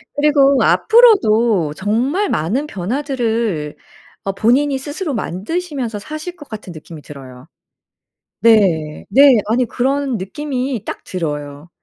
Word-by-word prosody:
그리고 285 -2 +3
앞으로도 230 - +4
정말 250 - -1
많은 220 - -1
변화들을 230 - -2 0.5
어 195 - 0
본인이 265 +7 +2
스스로 290 +4 -5
만드시면서 245 - -4
사실 310 - -7
것 295 -5 -14
같은 205 -5 -8
느낌이 155 0 -11
들어요. 135 -1 -12 0.9
네. 180 -10 +2
네. 275 -2 +6
아니 245 +2 +2
그런 265 +2 -1
느낌이 255 +3 -4
딱 - - -7
들어요. 150 -3 -5
235 Hz, 260 characters per minute, -17 LUFS, 180-285 Hz, 0.9 s, 네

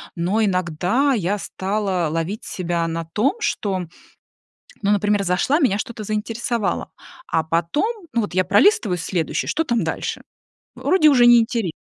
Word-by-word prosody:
Но 190 +6 0
иногда 185 - +1
я 205 -3 0
стала 190 -3 -2
ловить 165 +7 -3
себя 170 -2 -2
на 165 0 -3
том, 215 - 0
что, 195 - -1 1.0
ну, 200 0 +1
например, 205 0 +2
зашла, 195 - +1
меня 210 - +2
что-то 220 -1 -5
заинтересовало. 220 +2 -2 0.4
А 160 - 0
потом, 290 - -1
ну, 235 - +2
вот 205 - -4
я 185 0 +2
пролистываю 205 - +3
следующий: 170 -1 -2
"Что 325 +1 0
там 235 -4 0
дальше?" - - -3 0.5
Вроде 360 -5 +4
уже 250 -4 +5
не 240 0 +8
интере 225 -5 -1
205 Hz, 145 wpm, -21 LUFS, 180-235 Hz, 1.0 s, не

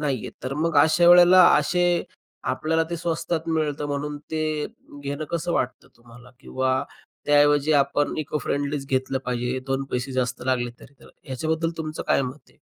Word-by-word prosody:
नाहीयेत. 140 -6 -2
तर 135 +1 -3
मग 160 0 -1
अशा 160 +4 +5
वेळेला 180 +1 +8
असे 175 +3 +1 0.5
आपल्याला 160 +1 0
ते 170 - -2
स्वस्तात 165 0 -2
मिळतं 150 -2 -1
म्हणून 145 +1 -3
ते 155 -1 -1 0.4
घेणं 145 +2 -4
कसं 170 +1 -2
वाटतं 125 -4 -2
तुम्हाला? 120 +1 -16
किंवा 130 0 -1 0.4
त्याऐवजी 145 +1 +4
आपण 145 0 +1
इको-फ्रेंडलीच 145 -2 -2
घेतलं 130 0 -1
पाहिजे, 125 +1 -2
दोन 135 0 -1
पैसे 125 +2 -3
जास्त 125 -1 -2
लागले 120 -2 0
तरी, - - -15
तर - - -16
ह्याच्याबद्दल 160 +4 -2
तुमचं 155 -1 -4
काय - - +3
मत 130 +3 -8
आहे? - - -28
145 Hz, 155 wpm, -24 LUFS, 130-160 Hz, 0.5 s, वेळेला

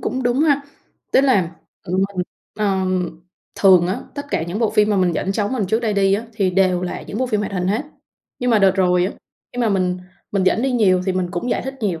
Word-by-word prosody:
cũng 260 - -2
đúng 245 +2 +1
ha. 290 -3 +3 0.5
Tức - - +6
là, 235 -11 +2 0.3
ừm, 185 +2 0
mình, 180 - 0 0.3
ừm, 185 -4 -1 0.3
thường 185 -3 +5
á, 185 - -2
tất 285 0 -6
cả - - 0
những 175 +5 -4
bộ 225 -2 +1
phim 210 -1 +3
mà 205 - +2
mình 180 -2 +2
dẫn 195 - -1
cháu 205 0 -1
mình 240 -5 -1
trước 220 +4 +1
đây 225 -3 0
đi 195 -1 +3
á 220 +3 -3
thì 195 -4 +1
đều 185 -1 +2
là 180 - -4
những 210 - -6
bộ 260 - 0
phim 215 -4 0
hoạt 205 - -4
hình 180 -2 -1
hết. 215 +7 0 0.6
Nhưng 250 0 0
mà 225 - +5
đợt 195 -1 +5
rồi 180 -1 +3
á, - - -4 0.4
khi 245 - -3
mà 235 - +2
mình 185 -3 0 0.3
mình 195 -2 +1
dẫn 215 +5 +2
đi 270 - +1
nhiều 190 -7 +3
thì 190 - +1
mình 185 -1 -2
cũng 195 +7 -3
giải - - 0
thích 265 +2 -5
nhiều. 185 -7 -1
195 Hz, 255 wpm, -20 LUFS, 185-225 Hz, 0.6 s, Tức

